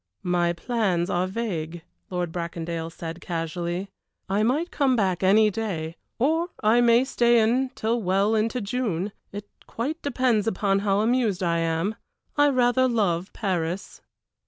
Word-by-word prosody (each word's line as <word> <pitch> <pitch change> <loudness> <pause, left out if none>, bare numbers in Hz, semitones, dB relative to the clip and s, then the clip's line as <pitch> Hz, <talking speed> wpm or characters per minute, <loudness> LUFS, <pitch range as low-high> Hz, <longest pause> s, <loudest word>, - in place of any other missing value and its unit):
"My 175 -1 +1
plans 185 -2 -1
are 180 +1 +1
vague," 175 -6 -4 0.3
Lord 180 -2 -2
Bracondale 170 -1 -4
said, 165 +1 -7
casually. 175 +3 -3 0.4
"I 200 +2 +1
might 285 +10 +1
come 270 -3 +2
back 190 -6 0
any 210 +3 +5
day, 175 -7 -3 0.2
or 325 +7 +1
I 225 +3 +5
may 235 +1 +5
stay 240 -3 +3
until 235 0 +1
well 195 +3 +2
into 225 +3 0
June 205 -4 -2 0.2
it 205 0 -7 0.2
quite 295 +8 -3
depends 250 -6 +1
upon 200 -2 +1
how 200 0 +1
amused 220 -5 +1
I 170 -1 +1
am. 165 +5 0 0.4
I 290 0 +5
rather 255 -1 +3
love 195 -6 0
Paris." 180 -3 -3
200 Hz, 140 wpm, -25 LUFS, 175-235 Hz, 0.4 s, any